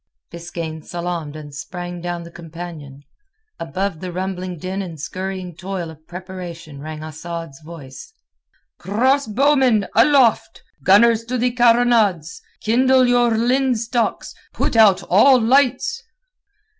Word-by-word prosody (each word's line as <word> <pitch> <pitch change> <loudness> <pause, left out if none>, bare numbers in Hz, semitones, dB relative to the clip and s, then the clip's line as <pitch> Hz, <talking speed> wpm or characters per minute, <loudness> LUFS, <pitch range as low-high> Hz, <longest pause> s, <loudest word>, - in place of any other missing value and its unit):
Biskaine 170 -2 -6
salaamed 170 -3 -5
and 150 -2 -10
sprang 175 +4 -7
down 175 0 -4
the 170 - -12
companion. 165 -4 -10 0.6
Above 185 +1 -3
the 185 0 -6
rumbling 185 0 -4
din 185 +4 -4
and 170 -5 -8
scurrying 185 +2 -5
toil 180 -2 -5
of 160 0 -18
preparation 175 -4 -9
rang 155 0 -7
Asad's 160 -1 -7
voice. 150 -5 -11 0.7
"Crossbowmen, 255 +2 +2
aloft! 240 -2 +3 0.2
Gunners 225 +5 +5
to 250 +2 -2
the 250 +1 +1
carronades! 230 -8 +2 0.2
Kindle 255 +3 +3
your 245 -1 +3
linstocks! 240 -1 0 0.2
Put - - -2
out 215 -4 +5
all 255 +8 +5
lights!" 270 - +2
185 Hz, 115 wpm, -20 LUFS, 170-235 Hz, 0.7 s, Gunners